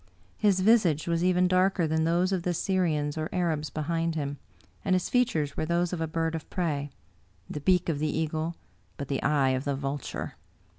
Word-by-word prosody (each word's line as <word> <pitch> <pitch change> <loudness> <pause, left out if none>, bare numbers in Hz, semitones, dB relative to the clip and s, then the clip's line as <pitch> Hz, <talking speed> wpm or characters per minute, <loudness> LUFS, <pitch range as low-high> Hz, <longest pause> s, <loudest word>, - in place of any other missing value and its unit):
His 200 -3 +3
visage 185 -8 +4
was 170 0 +1
even 180 0 +3
darker 185 -1 +3
than 160 0 +1
those 175 +3 +2
of 190 -2 0
the 175 0 -1
Syrians 160 -6 0
or 155 - -2
Arabs 160 -5 -1
behind 165 +3 -1
him, 145 -2 -3 0.4
and 190 -2 +2
his 185 - -1
features 165 - +1
were - - -2
those 170 +2 0
of 170 - -2
a 160 - 0
bird 165 +1 -1
of 160 - -5
prey: 150 -5 -1 0.6
the 150 - -5
beak 180 +3 +3
of 155 -4 0
the 155 0 0
eagle, 160 +1 -2 0.4
but 140 - -6
the 135 - -1
eye 145 -3 +3
of 130 0 0
the 140 -1 -1
vulture. 135 0 -4
165 Hz, 195 wpm, -28 LUFS, 150-180 Hz, 0.6 s, visage